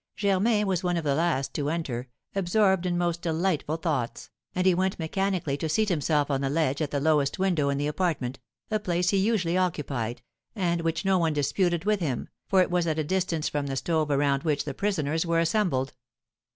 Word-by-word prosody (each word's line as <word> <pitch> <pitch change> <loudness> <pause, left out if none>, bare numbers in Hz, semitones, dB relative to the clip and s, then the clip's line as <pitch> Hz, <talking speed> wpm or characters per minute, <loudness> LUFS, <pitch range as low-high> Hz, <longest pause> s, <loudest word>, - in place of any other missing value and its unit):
Germain 210 +2 +2
was 190 -2 0
one 175 -1 +1
of 165 - -2
the 145 -2 +1
last 140 -4 0
to 145 -1 -1
enter, 130 -7 -3 0.2
absorbed 190 -1 +2
in 175 -1 0
most 175 -1 0
delightful 165 -2 0
thoughts, 135 -9 -3 0.2
and 180 0 0
he 185 - +6
went 190 +2 0
mechanically 175 -3 -1
to 160 +2 -3
seat 215 +7 +2
himself 150 -3 +1
on 135 -1 0
the 135 - 0
ledge 145 -1 0
at 150 - 0
the 140 - -1
lowest 145 -1 +2
window 175 -7 +1
in 140 - 0
the 145 - -1
apartment, 150 -5 -1 0.3
a 215 - +2
place 180 -2 0
he 200 - +2
usually 190 -4 +1
occupied, 135 -10 -2 0.3
and 175 -4 0
which 165 +2 -1
no 190 -1 +3
one 165 -2 +1
disputed 170 +4 0
with 210 -1 +2
him, 140 -9 -2 0.2
for 190 -1 +5
it 180 - -4
was 175 -1 +1
at 160 -1 0
a 155 - +1
distance 175 -1 -1
from 145 -1 -2
the 135 - -2
stove 155 +2 0
around 140 -1 +2
which 150 -2 0
the 140 - -3
prisoners 160 -2 0
were 170 -1 0
assembled. 165 -7 +1
165 Hz, 205 wpm, -27 LUFS, 145-185 Hz, 0.3 s, he